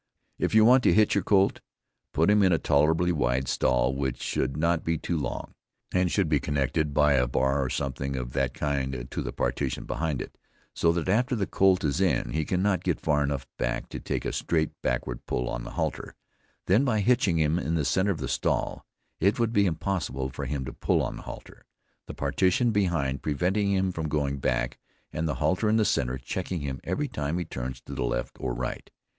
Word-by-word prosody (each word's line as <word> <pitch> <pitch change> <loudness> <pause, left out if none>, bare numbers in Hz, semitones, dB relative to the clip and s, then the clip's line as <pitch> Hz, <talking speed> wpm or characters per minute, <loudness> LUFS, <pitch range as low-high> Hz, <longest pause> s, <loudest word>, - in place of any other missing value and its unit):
If - - 0
you 110 0 +7
want 125 +3 +7
to - - +6
hitch 110 0 +4
your 100 - +1
colt, 100 -1 +3 0.5
put 80 +7 +3
him 105 0 +5
in 95 -2 +4
a 85 - +4
tolerably 80 +5 +2
wide 65 -4 0
stall 65 0 +2
which 65 -2 -2
should 70 - -1
not 85 +1 +1
be 80 0 0
too 85 - -3
long, 65 -6 -4 0.4
and 90 -1 +2
should 100 -5 +2
be 75 -2 +2
connected 70 +2 0
by 75 0 +4
a 60 -2 +3
bar 65 +3 +1
or 65 - -2
something 70 +1 -3
of 60 -1 -4
that - - 0
kind 65 -4 -2
to - - -3
the - - -4
partition - - -2
behind 80 -4 -2
it; - - -8 0.3
so 85 - +3
that, 85 0 -2
after 125 +7 +2
the 100 -4 0
colt 95 -1 +3
is 75 +4 0
in 95 -3 +1
he 80 0 -1
cannot 95 +2 +1
get - - 0
far 75 -2 +1
enough 70 -1 -2
back - - -2
to - - -6
take - - -3
a - - -2
straight, 80 -2 0
backward - - -2
pull 60 - -1
on - - -3
the - - -6
halter; - - -3 0.5
then 105 +8 +4
by 115 -6 +1
hitching 100 -6 +3
him 80 +2 +2
in 85 -2 -1
the 75 -3 0
center 95 +8 +2
of 95 - 0
the 70 -2 -4
stall, - - -1 0.4
it 100 +4 +3
would 115 -1 +1
be 100 -2 +4
impossible 80 -7 -2
for - - -6
him 70 -3 -3
to 65 - -6
pull - - +1
on - - -4
the - - -8
halter, - - -11 0.4
the - - -7
partition 95 +6 +2
behind 85 -10 0
preventing 95 +7 0
him 95 -1 +1
from 80 -3 -3
going 70 -2 0
back, - - -1 0.3
and 80 +1 -1
the 75 - -1
halter 90 +8 +1
in 110 - +3
the 110 -1 +3
center 65 -6 0
checking 90 +6 -4
him 70 -2 -4
every 150 0 -1
time 75 - -3
he 90 - -2
turns 65 -4 -5
to 70 - -9
the 65 - -4
left - - -2
or 60 -2 -2
right. - - -4
80 Hz, 215 wpm, -27 LUFS, 65-95 Hz, 0.5 s, you